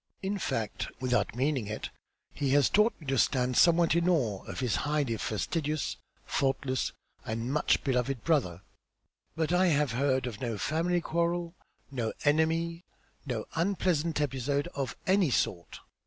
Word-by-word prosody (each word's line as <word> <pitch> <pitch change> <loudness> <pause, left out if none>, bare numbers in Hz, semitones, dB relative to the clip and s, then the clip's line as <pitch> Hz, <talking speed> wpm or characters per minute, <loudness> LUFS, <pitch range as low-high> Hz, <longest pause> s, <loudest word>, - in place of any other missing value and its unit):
In 200 +1 -1
fact, 110 - -2
without 125 -2 0
meaning 130 -3 0
it, 105 +1 -5 0.4
he 140 -2 -1
has 145 -2 +4
taught 210 +3 +3
me 155 - -13
to 135 -2 +1
stand 125 +1 +2
somewhat 170 +2 +5
in 170 +1 +2
awe 120 - +1
of - - -7
this 125 -5 0
highly 145 -5 0
fastidious, 150 - -2 0.3
faultless 135 -1 0 0.3
and 115 +4 -3
much 150 - +2
beloved 125 -2 0
brother, 105 - +1 0.7
but 160 +1 0
I 185 +1 +4
have 150 -5 +2
heard 130 +1 +1
of 120 -2 -6
no 115 -4 -2
family 170 - 0
quarrel, 170 +1 -1 0.4
no 120 -5 -2
enemy, 165 +3 +1 0.4
no 115 -5 -2
unpleasant 170 -3 0
episode 140 0 0
of 135 -4 -3
any 190 -3 +3
sort. 85 -8 -1
145 Hz, 145 wpm, -30 LUFS, 125-165 Hz, 0.7 s, somewhat